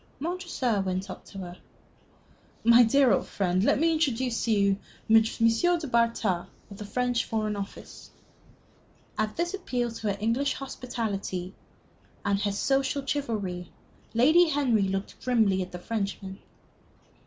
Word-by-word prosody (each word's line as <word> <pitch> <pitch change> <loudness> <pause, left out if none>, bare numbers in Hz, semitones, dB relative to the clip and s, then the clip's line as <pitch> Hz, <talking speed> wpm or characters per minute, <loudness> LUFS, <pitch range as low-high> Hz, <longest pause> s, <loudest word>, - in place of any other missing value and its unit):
Montresor 315 - -1
went 185 +1 -3
up - - -10
to - - -12
her. 180 -2 -7 1.1
"My 235 +1 +7
dear 245 0 +5
old - - 0
friend, 185 -1 0
let - - +3
me 330 +1 +3
introduce 260 -6 0
to 230 - +1
you 200 -2 +3 0.3
M. 225 0 +7
du 230 +10 +1
Bartas, 230 -7 +1 0.2
of 200 - -9
the 210 - -7
French 245 +2 0
Foreign 215 -1 -1
Office." 200 -1 -8 1.1
At 215 0 -2
this 345 +2 -1
appeal 250 -11 -2
to 225 -1 -5
her 200 - -1
English 235 +7 0
hospitality 210 -8 -4 0.7
and 200 -1 +1
her 205 0 0
social 270 +6 0
chivalry, 210 -11 -3 0.4
Lady 315 +9 +5
Henry 265 -7 +2
looked 195 +1 -4
grimly 220 -7 +2
at 185 - -5
the 180 - -6
Frenchman. 200 -1 -4
225 Hz, 140 wpm, -27 LUFS, 200-265 Hz, 1.1 s, My